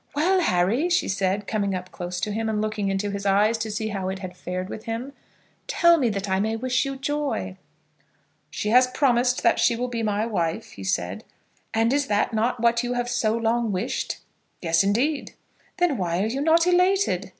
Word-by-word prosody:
"Well, 365 +6 +3
Harry," 225 - +2
she 345 - +2
said, 195 +1 -1
coming 200 -2 -1
up 180 0 -6
close 175 0 -5
to 210 - -1
him, 220 +1 -2
and 215 -1 -1
looking 215 -2 -1
into 195 +1 -1
his 200 0 -4
eyes 205 +3 +3
to 225 -1 -3
see 220 +1 -3
how 195 -3 -3
it 190 - -3
had 185 -2 -8
fared 185 0 -4
with 220 +2 -8
him, 235 +5 -4 0.5
"tell 340 0 +5
me 250 -4 +2
that 200 -1 -3
I 190 0 +1
may 220 +2 0
wish 255 +3 0
you 275 0 -3
joy." 275 - -2 0.9
"She 210 - -3
has 250 +3 +6
promised 250 -1 +1
that - - +3
she 235 - +3
will 250 +2 -2
be 235 -1 -3
my 210 0 0
wife," 170 -8 -2
he 95 - -10
said. 95 +1 -2 0.5
"And 225 +2 +2
is 285 0 0
not 205 +3 +1
that 235 +3 0
what 235 0 +3
you 245 0 -2
have 245 0 -2
so 230 -2 +1
long 230 0 0
wished?" 200 +7 -2 0.4
"Yes, 165 0 +2
indeed." 255 +9 0 0.4
"Then 355 -7 +2
why 175 0 0
are - - +1
you 250 +5 -2
not 325 +2 +4
elated?" 360 - +2
220 Hz, 205 wpm, -24 LUFS, 195-250 Hz, 0.9 s, has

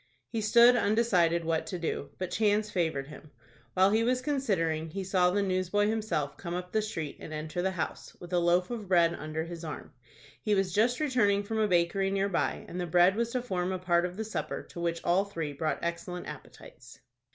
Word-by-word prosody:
He 225 - -1
stood 235 +3 +6
undecided 200 -7 +2
what 160 -1 0
to 180 - -4
do; 160 -4 -3
but 185 -1 -4
chance 210 0 +1
favored 160 -7 -1
him. 150 +1 -12 0.5
While 190 +2 +5
he 220 +2 +3
was 250 +2 +2
considering, 175 - 0
he 195 +4 -4
saw 185 -1 +3
the 200 +2 +1
newsboy 185 +2 +1
himself 215 -10 -2
come 175 -2 -5
up 180 0 -5
the 220 - +2
street 165 -9 -5
and - - -9
enter 155 +3 -4
the 190 - +1
house, 185 -4 -5
with 175 0 -9
a 175 - +4
loaf 175 +4 +2
of 220 -4 -5
bread 170 -2 +4
under 155 0 -4
his 170 0 -8
arm. 155 -2 -7 0.5
He 210 -1 +1
was 195 -2 0
just 235 +5 +2
returning 220 -9 +2
from 220 +2 -3
a 215 - +3
bakery 180 +1 +2
near 195 +1 0
by, 180 - -1
and 180 - -5
the 175 - -3
bread 175 +3 +5
was 230 +1 0
to 250 -1 -1
form 185 -5 -2
a 185 - -1
part 175 -1 +2
of 180 +1 -10
the 220 - -3
supper 220 - -4
to - - -8
which 170 -1 -2
all 180 +3 +3
three 165 -7 -5
brought 155 +2 -2
excellent 170 +1 -4
appetites. - - -12
185 Hz, 215 wpm, -29 LUFS, 170-210 Hz, 0.5 s, stood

